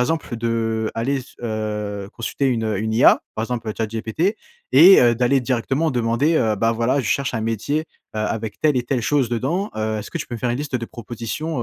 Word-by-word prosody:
exemple 140 Hz, -2 st, -1 dB
de 115 Hz, -1 st, -1 dB
aller 130 Hz, +5 st, 0 dB
s 135 Hz, +3 st, -11 dB
heu, 105 Hz, -3 st, -3 dB
consulter 130 Hz, +4 st, -2 dB
une 115 Hz, -3 st, 0 dB
une 110 Hz, +2 st, -2 dB
IA 120 Hz, -, +6 dB
par 110 Hz, -, -2 dB
exemple 115 Hz, -2 st, -3 dB
ChatGPT 115 Hz, -, -1 dB, 0.4 s
et, 190 Hz, +3 st, +9 dB
heu, 120 Hz, -1 st, +5 dB
d'aller 125 Hz, +3 st, +2 dB
directement 135 Hz, +5 st, 0 dB
demander, 125 Hz, +5 st, +1 dB
heu: 110 Hz, -5 st, +2 dB
«Bah, 115 Hz, +3 st, +2 dB
voilà 120 Hz, +5 st, +1 dB
je -, -, -6 dB
cherche 140 Hz, +1 st, 0 dB
un 115 Hz, -, -1 dB
métier, 115 Hz, +7 st, -1 dB, 0.4 s
heu, -, -, -1 dB
avec 110 Hz, 0 st, -3 dB
telle 150 Hz, -3 st, +3 dB
et 125 Hz, -, +1 dB
telle 125 Hz, -1 st, -1 dB
chose 135 Hz, +1 st, +1 dB
dedans, 145 Hz, -, -1 dB
heu, 110 Hz, 0 st, -1 dB
est-ce 105 Hz, -, -7 dB
que -, -, -4 dB
tu -, -, -5 dB
peux 120 Hz, -, -6 dB
me -, -, -5 dB
faire 125 Hz, -, 0 dB
une 120 Hz, -, -1 dB
liste 145 Hz, -3 st, -2 dB
de 115 Hz, -2 st, -5 dB
propositions, 120 Hz, +5 st, -5 dB
120 Hz, 215 wpm, -21 LUFS, 110-135 Hz, 0.4 s, et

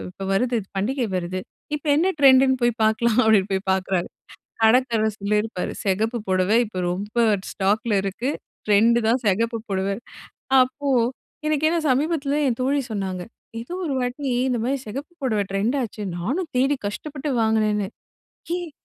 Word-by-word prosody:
இப்ப 190 Hz, -, -11 dB
வருது 240 Hz, +5 st, +1 dB, 0.2 s
பண்டிகை 240 Hz, +6 st, 0 dB
வருது. 180 Hz, +1 st, -2 dB, 0.4 s
இப்ப 300 Hz, +1 st, -5 dB
என்ன 345 Hz, +5 st, +3 dB
ட்ரெண்ட்டுன்னு 265 Hz, -1 st, +6 dB
போய் 240 Hz, -1 st, +3 dB
பார்க்கலாம்?" 220 Hz, +1 st, +2 dB
அப்படீன்னு 210 Hz, -3 st, +3 dB
போய் 190 Hz, 0 st, -2 dB
பார்க்கிறாங்க. 190 Hz, -1 st, -1 dB, 0.6 s
கடைக்காரர் 225 Hz, -2 st, +3 dB
சொல்லியிருப்பாரு, 210 Hz, -1 st, -1 dB
"செகப்பு 220 Hz, +5 st, 0 dB
புடவை 185 Hz, +4 st, +3 dB
இப்ப 185 Hz, -4 st, -5 dB
ரொம்ப 205 Hz, +5 st, -5 dB, 0.3 s
ஸ்டாக்ல 210 Hz, +2 st, +1 dB
இருக்கு. 225 Hz, +8 st, -2 dB, 0.4 s
ட்ரெண்ட்டு 225 Hz, +3 st, +4 dB
தான் 245 Hz, +2 st, +2 dB
செகப்பு 230 Hz, +4 st, +1 dB
பொடவை. 195 Hz, 0 st, -1 dB, 0.7 s
அப்போ, 270 Hz, +3 st, -3 dB, 0.6 s
எனக்கு 305 Hz, -1 st, +1 dB
ஏன்னா 340 Hz, -, +1 dB
சமீபத்தில 285 Hz, +1 st, +1 dB
என் 240 Hz, -1 st, -2 dB
தோழி 280 Hz, +2 st, +1 dB
சொன்னாங்க, 190 Hz, -3 st, -3 dB, 0.4 s
ஏதோ 245 Hz, +10 st, -7 dB
ஒரு 285 Hz, -, -1 dB
வாட்டி 255 Hz, +2 st, -2 dB, 0.2 s
இந்த 250 Hz, -2 st, 0 dB
மாரி 270 Hz, +3 st, 0 dB
செகப்பு 275 Hz, +10 st, -6 dB
பொடவ 225 Hz, -6 st, +1 dB
ட்ரெண்ட் 210 Hz, +7 st, 0 dB
ஆச்சு. 215 Hz, -2 st, -6 dB, 0.2 s
நானும் 295 Hz, -, -2 dB
தேடி 270 Hz, +3 st, +3 dB
கஷ்டப்பட்டு 285 Hz, +7 st, -4 dB
வாங்கினேன்னு. 215 Hz, -2 st, +1 dB, 0.7 s
"ஏய் 350 Hz, -2 st, -5 dB
230 Hz, 145 wpm, -23 LUFS, 200-265 Hz, 0.7 s, ட்ரெண்ட்டுன்னு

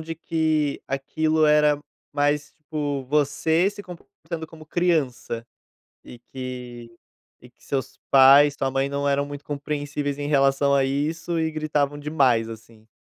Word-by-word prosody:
de 165 Hz, +1 st, -6 dB
que 155 Hz, -3 st, 0 dB
aquilo 155 Hz, +3 st, 0 dB
era 150 Hz, -1 st, +4 dB, 0.4 s
mais, 145 Hz, 0 st, 0 dB
tipo, 150 Hz, -3 st, -4 dB
você 150 Hz, +5 st, +2 dB
se 205 Hz, 0 st, -8 dB
comportando 170 Hz, -2 st, -9 dB
como 155 Hz, 0 st, -14 dB
criança, 150 Hz, -9 st, -1 dB, 0.6 s
e 120 Hz, -, -12 dB
que 125 Hz, -2 st, -7 dB, 0.5 s
e -, -, -16 dB
que -, -, -32 dB
seus 135 Hz, -2 st, -4 dB
pais, 140 Hz, +2 st, +7 dB
sua 135 Hz, -1 st, -1 dB
mãe 135 Hz, +1 st, 0 dB
não 140 Hz, 0 st, -1 dB
eram 140 Hz, 0 st, +1 dB
muito 145 Hz, 0 st, -8 dB
compreensíveis 145 Hz, 0 st, -3 dB
em 145 Hz, -, -3 dB
relação 140 Hz, -1 st, +3 dB
a 140 Hz, -, +3 dB
isso 155 Hz, +5 st, -2 dB
e 160 Hz, 0 st, 0 dB
gritavam 150 Hz, -2 st, -1 dB
demais, 135 Hz, -7 st, +2 dB
assim. 110 Hz, 0 st, -12 dB
145 Hz, 145 wpm, -24 LUFS, 135-155 Hz, 0.6 s, pais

